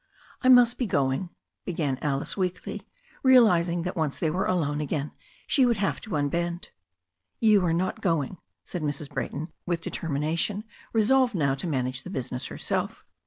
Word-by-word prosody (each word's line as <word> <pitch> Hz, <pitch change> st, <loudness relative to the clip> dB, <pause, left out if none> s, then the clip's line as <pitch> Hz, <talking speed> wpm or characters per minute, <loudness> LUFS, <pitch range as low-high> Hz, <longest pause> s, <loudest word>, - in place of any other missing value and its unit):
"I 255 Hz, -, +3 dB
must 245 Hz, -2 st, +6 dB
be 250 Hz, -, 0 dB
going," 140 Hz, +1 st, 0 dB, 0.3 s
began 150 Hz, -7 st, -2 dB
Alice 140 Hz, -2 st, -1 dB
weakly, 185 Hz, +2 st, -3 dB, 0.4 s
realizing 180 Hz, -10 st, +5 dB
that 180 Hz, +2 st, -3 dB
once 155 Hz, -5 st, -1 dB
they 160 Hz, -, 0 dB
were 190 Hz, +5 st, 0 dB
alone 150 Hz, -5 st, 0 dB
again 150 Hz, 0 st, -2 dB, 0.3 s
she 270 Hz, -, +3 dB
would 240 Hz, -3 st, +3 dB
have 195 Hz, 0 st, -1 dB
to 215 Hz, -, -5 dB
unbend. 170 Hz, +4 st, -1 dB, 0.7 s
"You 215 Hz, -4 st, +5 dB
are 165 Hz, -, +2 dB
not 180 Hz, +3 st, -1 dB
going," 165 Hz, -1 st, 0 dB, 0.3 s
said 180 Hz, -, -4 dB
Mrs. 145 Hz, -1 st, -3 dB
Brayton 155 Hz, +4 st, -3 dB, 0.2 s
with 170 Hz, -1 st, -1 dB
determina* 155 Hz, +1 st, -2 dB
tion, 205 Hz, +4 st, -1 dB, 0.3 s
resolved 245 Hz, +2 st, +3 dB
now 140 Hz, -5 st, +2 dB
to 135 Hz, +6 st, -4 dB
manage 130 Hz, -3 st, -1 dB
the 180 Hz, -, -9 dB
business 130 Hz, -7 st, -3 dB
herself. -, -, -3 dB
170 Hz, 165 wpm, -27 LUFS, 145-195 Hz, 0.7 s, must